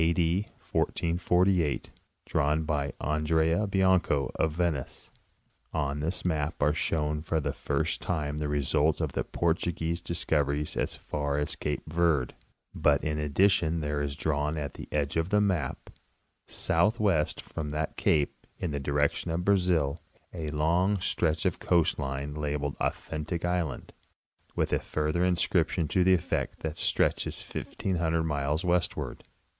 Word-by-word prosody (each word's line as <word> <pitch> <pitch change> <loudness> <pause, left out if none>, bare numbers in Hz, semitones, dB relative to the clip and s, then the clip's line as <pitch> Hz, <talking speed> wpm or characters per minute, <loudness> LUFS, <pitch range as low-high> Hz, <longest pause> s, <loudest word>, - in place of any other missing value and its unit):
D. 85 +4 +2 0.2
1448, 90 -1 +1 0.3
drawn 75 +3 +1
by 75 -2 -1
Andrea 80 +5 +1
Bianco, 95 -8 +2
of 80 - +1
Venice. 80 -5 -2 0.6
On 70 -2 -1
this 85 +5 -2
map 80 -2 0
are 75 +1 +4
shown 75 -2 0
for 80 0 0
the 75 - -2
first 75 +3 -1
time 75 -4 -2
the 75 - -1
result 75 +2 +2
of - - -1
the - - -1
Portuguese 85 0 -1
discoy 80 -2 0
eries 75 +2 -2
as - - -1
far 70 -1 -2
as 75 - -1
cape 75 - -3
Verd, 80 -5 +1 0.4
but 70 -1 +3
in 75 -1 -1
addition 85 +2 +2
there 75 -1 -1
is 70 -1 -2
drawn 75 0 -1
at 75 -2 -4
the - - -9
edge 75 0 0
of 80 +2 0
the 105 +1 +4
map, 90 -10 -1 0.6
southwest 95 -3 +1
from 75 -2 -5
that 75 0 -2
cape, 75 -2 +1
in 85 - -3
the 70 - -2
direction 70 +4 0
of 85 +2 -1
Brazil, 90 -7 +2 0.3
a 80 -3 -4
long 85 +7 +2
stretch 80 -3 0
of - - +1
coast 85 -3 +2
line 70 +2 -3
labeled 75 -1 -2
''Authentic 80 +2 -2
island," 90 -2 -2 0.6
with - - 0
a - - +3
further 75 +3 -1
inscription 85 -2 +2
to 90 - +3
the 95 +1 +6
effect 85 - -2
that 80 - -2
it 80 - -14
stretches - - +1
'£1,500 85 -3 -2
miles 75 +2 -1
westward. 90 -1 0
80 Hz, 145 wpm, -29 LUFS, 75-85 Hz, 0.6 s, the